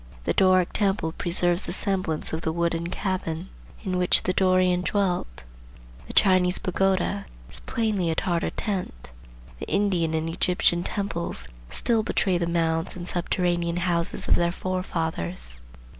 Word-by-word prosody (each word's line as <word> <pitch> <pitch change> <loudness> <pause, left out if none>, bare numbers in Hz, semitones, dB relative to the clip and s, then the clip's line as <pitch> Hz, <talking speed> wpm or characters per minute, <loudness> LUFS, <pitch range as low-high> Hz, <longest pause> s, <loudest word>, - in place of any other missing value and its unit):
The - - 0
Doric 185 -2 +4
temple 195 -5 +1
preserves 175 +2 0
the - - -2
semblance 185 -8 -1
of 160 - -2
the 160 - -1
wooden 170 0 -1
cabin 180 -2 -3 0.3
in 185 -3 -1
which 180 - +3
the 185 - 0
Dorian 185 -1 +3
dwelt. 180 - -1 0.6
The - - -7
Chinese 185 -2 +4
pagoda 185 - 0 0.2
is - - -5
plainly 210 -6 -1
a 160 - 0
Tartar 170 -1 0
tent. 185 - -4 0.5
The - - -6
Indian 180 -6 +1
and 160 0 -1
Egyptian 175 +1 +2
temples 170 - -3 0.2
still 230 -2 +3
betray 190 -4 +1
the 170 - 0
mounds 165 -1 0
and 175 -1 -7
subterranean 175 -1 0
houses 170 -1 0
of - - +5
their 170 0 +2
forefathers. 160 - -2
175 Hz, 145 wpm, -25 LUFS, 165-185 Hz, 0.6 s, of